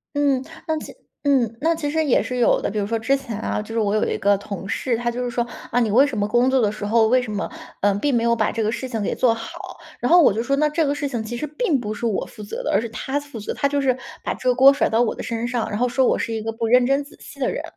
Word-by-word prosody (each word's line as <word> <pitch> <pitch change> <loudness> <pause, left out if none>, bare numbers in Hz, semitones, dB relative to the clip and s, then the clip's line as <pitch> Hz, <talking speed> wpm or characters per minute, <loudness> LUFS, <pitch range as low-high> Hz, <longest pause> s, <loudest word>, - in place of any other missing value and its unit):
嗯， 280 -3 +2 0.2
那 315 -1 0
其 - - -10 0.3
嗯， 250 -6 +2
那 325 +2 +3
其 320 -3 -3
实 320 +2 +1
也 270 - +3
是 250 - -4
有 240 - +3
的。 - - -1
比 215 - -5
如 205 - 0
说 225 +2 -1
之 225 +5 +2
前 230 -6 -6
啊， - - -2
就 215 +1 -9
是 230 - 0
我 210 -1 +1
有 215 - +2
一 - - -1
个 200 0 +3
同 200 -1 -7
事， 235 +2 0
他 240 +1 -1
就 245 +1 -3
是 245 - -2
说： 240 0 0 0.3
“啊， 245 - +2
你 230 -3 +1
为 250 +7 +5
什 285 -4 -4
么 205 0 +1
工 240 +4 +3
作 265 -1 +3
的 210 -2 +2
时 210 -1 -6
候 220 +1 +3
为 255 +3 +4
什 245 -3 -6
么， 210 0 -3 0.3
嗯， 200 -1 +2
并 285 +5 +1
没 235 -1 +2
有 235 0 +3
把 220 -2 +1
这 230 - -2
个 215 0 +1
事 260 +3 -4
情 230 -4 -3
给 205 - -1
做 245 -3 +3
好？” 225 0 -8 0.4
然 245 - 0
后 350 0 +8
我 300 - +6
就 225 +3 -1
说： 275 +3 +1
“那 300 +1 +3
这 315 +1 +1
个 285 - +1
事 290 0 -2
情 240 -5 -3
其 230 +2 -5
实 300 - -3
并 300 - 0
不 215 -3 -4
是 215 - -5
我 215 -5 0
负 210 - -11
责 205 - -5
的。” - - -3
而 - - +5
是 230 - -3
他 265 +6 -3
负 285 -5 -9
责， 205 - -4
他 280 - +1
就 285 0 0
是 260 -2 +1 0.3
把 - - -1
这 - - -6
个 - - +4
锅 265 +2 +7
甩 280 - +1
到 225 +1 +2
我 240 - +1
的 - - -6
身 230 -1 -3
上， 245 -2 -1
然 205 - -3
后 250 - +2
说 260 +2 +2
“我 - - +2
是 - - -2
一 220 - -2
个 225 - -2
不 225 0 -2
认 250 +2 +5
真 275 +2 +2
仔 285 - -16
细 - - -13
的 - - +1
人”， - - -4
240 Hz, 355 characters per minute, -22 LUFS, 220-275 Hz, 0.4 s, 后